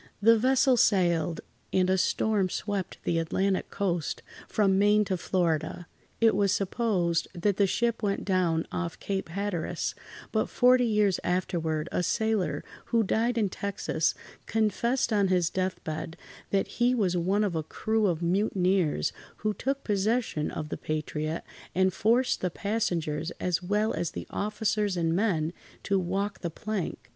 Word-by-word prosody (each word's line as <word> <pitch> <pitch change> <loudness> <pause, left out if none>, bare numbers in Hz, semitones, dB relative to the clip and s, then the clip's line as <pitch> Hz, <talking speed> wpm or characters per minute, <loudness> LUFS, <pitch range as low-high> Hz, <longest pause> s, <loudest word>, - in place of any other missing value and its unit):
The 230 +3 +6
vessel 260 +2 +3
sailed—and 180 -1 +1
a 190 - +3
storm 195 +1 +1
swept 200 -1 -3
the 165 - +1
Atlantic 190 +4 0
coast 175 -6 -2 0.2
from 195 -3 +2
Maine 210 +1 +4
to 190 - -1
Florida. 170 -1 -1 0.3
It 225 -3 +4
was 200 -1 +2
supposed 185 -5 0
that 200 +2 +1
the 200 - +4
ship 235 +3 0
went 200 -2 -1
down 180 -4 +1
off 170 -2 -3
Cape 195 -4 -3
Hatteras, 190 -2 -2 0.4
but 220 -1 0
forty 250 0 +4
years 210 -4 +2
afterward, 165 -3 -1
a - - 0
sailor, 220 0 0 0.2
who 230 -2 +2
died 230 +4 +1
in 215 -3 +2
Texas, 200 +2 -1 0.3
confessed 225 +3 +1
on 200 -2 +3
his 180 -3 +2
death 185 0 -2
bed 160 +1 -5 0.3
that 195 -1 +1
he 245 +1 +4
was 190 -6 +1
one 190 +5 +1
of 200 -4 0
a 160 - 0
crew 220 +7 0
of 170 -2 -1
mutineers 185 -2 +1 0.3
who 215 - +2
took 275 +5 -2
possession 210 -5 0
of 155 -1 -5
the - - -4
Patriot 155 +1 -3 0.3
and 185 0 +3
forced 240 +6 +2
the 180 - 0
passengers, 175 -7 -1
as 180 -1 0
well 210 +4 0
as 170 - -1
the - - -5
officers 210 -1 -1
and 165 -1 +1
men, 175 -6 +1 0.3
to 195 -1 +1
walk 195 +3 -2
the 170 - -2
plank. 200 +2 -4
195 Hz, 150 wpm, -28 LUFS, 175-215 Hz, 0.4 s, The